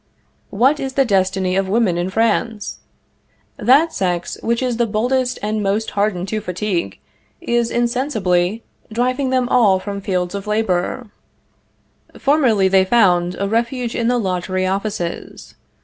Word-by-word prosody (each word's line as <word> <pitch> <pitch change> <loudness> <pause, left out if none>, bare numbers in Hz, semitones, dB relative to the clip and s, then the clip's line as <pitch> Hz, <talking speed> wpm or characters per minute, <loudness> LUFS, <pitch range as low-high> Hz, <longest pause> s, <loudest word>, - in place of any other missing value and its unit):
What 265 +9 +2
is 265 -1 -4
the 270 0 +3
destiny 190 -3 +1
of 195 0 0
women 210 -4 +2
in 175 +2 -1
France? 220 0 -1 0.8
That 275 +9 +4
sex 175 -2 -2
which 235 +2 0
is 245 -2 -1
the 235 -1 +1
boldest 250 +4 0
and 215 +1 -1
most 205 +2 -1
hardened 200 -3 -1
to 215 0 -2
fatigue, 180 - -3 0.4
is, 235 -1 0
insensibly, 225 -6 0 0.3
driving 255 +4 0
them 255 -1 +1
from 245 - 0
all 200 -6 +4 0.2
fields 180 -2 -2
of 200 0 -5
labor. 210 +2 -1 1.1
Formerly 255 -9 +3
they 190 0 +4
found 180 -4 +3
a 200 - 0
refuge 235 +2 -1
in 230 -1 0
the 245 0 +2
lottery 185 -2 -1
offices. 195 -2 -4
215 Hz, 140 wpm, -19 LUFS, 190-240 Hz, 1.1 s, That